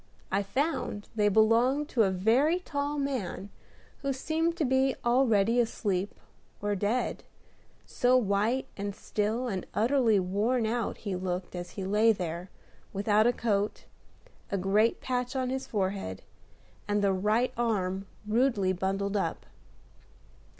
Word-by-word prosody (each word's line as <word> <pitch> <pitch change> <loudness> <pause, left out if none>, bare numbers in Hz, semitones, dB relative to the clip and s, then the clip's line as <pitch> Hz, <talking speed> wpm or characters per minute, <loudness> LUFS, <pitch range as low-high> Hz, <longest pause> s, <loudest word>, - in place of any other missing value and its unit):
I 195 +1 +2
found 210 -1 -2
they 210 -2 +3
belonged 230 +7 +3
to 240 - +2
a 200 - +4
very 230 - +3
tall 290 -4 -3
man 255 -8 -3 0.5
who 275 -1 -1
seemed 325 +5 -1
to 320 - +1
be 265 +1 +2
already 240 -2 +3
asleep 205 -4 -1 0.4
or 205 0 -1
dead, 205 +5 -1 0.6
so 250 +1 +3
white 220 +3 +1
and 200 0 -4
still 220 +5 -1
and 190 -6 -2
utterly 230 -2 +3
worn 210 +6 0
out 230 +1 -1
he 200 -3 -4
looked 180 0 -4
as 175 0 -6
he 195 - -3
lay 210 +4 +4
there, 175 -1 -5 0.4
without 210 +2 +3
a - - +5
coat, 205 -3 -1 0.7
a 200 - +1
great 205 +4 +2
patch 250 +1 -2
on 255 -1 -1
his 265 0 -3
forehead, 190 - -2 0.6
and 205 0 +1
the 195 -1 +3
right 215 +6 +1
arm 195 -5 -1 0.2
rudely 215 -4 +2
bundled 195 +2 -1
up. 200 - -2
215 Hz, 135 wpm, -29 LUFS, 195-250 Hz, 0.7 s, a